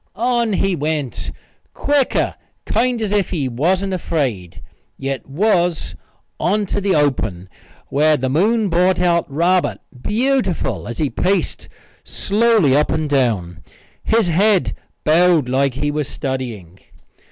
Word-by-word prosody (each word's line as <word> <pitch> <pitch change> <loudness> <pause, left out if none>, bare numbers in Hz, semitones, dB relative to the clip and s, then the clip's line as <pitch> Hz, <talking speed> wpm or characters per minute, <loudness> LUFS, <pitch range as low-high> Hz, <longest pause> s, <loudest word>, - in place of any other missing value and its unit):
On 235 -1 +1
he 195 -1 +1
went, 150 -4 -3 0.4
quicker, 285 -2 +1 0.3
kind 240 +2 +1
as 205 - -2
if 205 -2 +1
he 150 -8 -2
wasn't 180 +10 0
afraid, 130 - -3 0.3
yet 135 -2 -4
was, 175 - 0 0.4
on 205 +3 +1
to 205 - -2
the 195 -1 +1
open, 110 - 0 0.4
where 150 +2 +3
the 130 - -2
moon 205 - +2
brought 180 +1 +2
out 170 -4 +1
Robert 175 +5 +1 0.2
beautiful 240 - 0
as 120 - -6
he 150 -4 -1
paced 195 +2 -1 0.3
slowly 210 - +2
up 150 +1 +2
and 155 -2 -1
down, 105 - 0 0.4
his 225 -1 +2
head 190 +3 +2 0.3
bowed 165 -2 +4
like 135 0 +1
he 145 +2 -1
was 150 -2 -2
studying. 120 - -5
165 Hz, 130 wpm, -19 LUFS, 135-200 Hz, 0.4 s, bowed